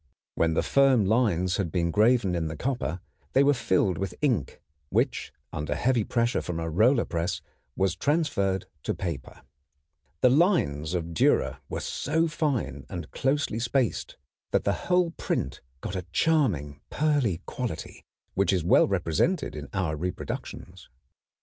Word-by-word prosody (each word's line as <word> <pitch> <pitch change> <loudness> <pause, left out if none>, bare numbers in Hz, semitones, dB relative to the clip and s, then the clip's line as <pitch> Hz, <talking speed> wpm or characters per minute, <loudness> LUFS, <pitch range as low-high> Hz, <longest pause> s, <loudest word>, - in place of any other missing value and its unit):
When 80 -1 +1
the - - +2
firm 135 -6 +4
lines 95 -5 +2
had 95 -6 -1
been 85 -1 0
graven 110 -1 +3
in 85 -2 -1
the 80 - -5
copper 120 - -2 0.3
they 135 - +5
were 145 +1 +5
filled 95 - +1
with 95 -2 -3
ink, 120 - 0 0.3
which - - 0 0.2
under 75 0 -2
heavy 120 +6 +2
pressure 120 +3 0
from 85 -2 -4
a 80 0 -3
roller 115 - +4
press 85 0 -2 0.4
was 95 -1 +1
transferred 130 - 0 0.2
to - - -2
paper. 80 -8 -6 0.8
The 125 - +6
lines 95 - +2
of 85 -1 -3
Dürer 80 - +2
were - - -3
so 160 +4 0
fine 140 - -1
and 90 -2 -6
closely 135 -4 0
spaced 120 - -1 0.3
that - - +1
the - - +2 0.2
whole 180 -2 +3
print - - -3 0.2
got 95 - -4
a 90 -1 -4
charming 90 - +1
pearly 140 - +1
quality 125 -11 -5 0.3
which 100 -1 +2
is 90 -4 +1
well 85 - +5
represented 100 - 0
in 75 -2 -7
our 90 -6 -1
reproductions. 90 +4 -6
95 Hz, 150 wpm, -27 LUFS, 85-135 Hz, 0.8 s, The